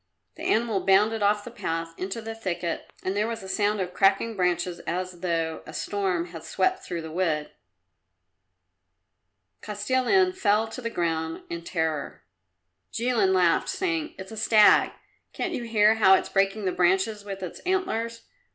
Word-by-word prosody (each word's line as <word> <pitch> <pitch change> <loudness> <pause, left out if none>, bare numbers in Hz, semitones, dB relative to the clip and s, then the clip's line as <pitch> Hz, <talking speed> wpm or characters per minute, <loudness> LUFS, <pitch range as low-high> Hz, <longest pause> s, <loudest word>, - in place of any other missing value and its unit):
The - - -12
animal 220 -3 +1
bounded 210 +3 +3
off 205 0 +2
the 240 - -9
path 165 -7 -4
into 195 +6 -5
the 225 0 -5
thicket 175 -6 -4
and 190 +1 -2
there 210 +2 +1
was 230 -3 -5
a - - -8
sound 205 +2 0
of 180 -1 -3
cracking 195 +3 +2
branches 180 -1 0
as 180 0 -3
though 165 -2 -1
a - - -9
storm 185 -4 -1
had 165 -2 -9
swept 375 - 0
through 170 -2 -5
the 160 - -7
wood. 160 -3 -1 2.1
Kostilin 260 - +1
fell 220 - +2
to 255 - -7
the 230 - -3
ground 165 -4 -2
in 170 0 -4
terror; 160 -4 -3 0.7
Jilin 230 -5 +1
laughed, 180 -3 +3
saying, 335 -5 -2
"It's 190 +2 -9
a 220 - -8
stag. 215 -1 +5 0.4
Can't - - -3
you 240 - -3
hear 215 -1 +4
how 200 -4 +6
it's - - -1
breaking 195 +1 +1
the 185 - +1
branches 190 +4 +1
with 195 -2 -6
its 180 - -6
antlers? 230 -12 -2
195 Hz, 160 wpm, -26 LUFS, 175-225 Hz, 2.1 s, how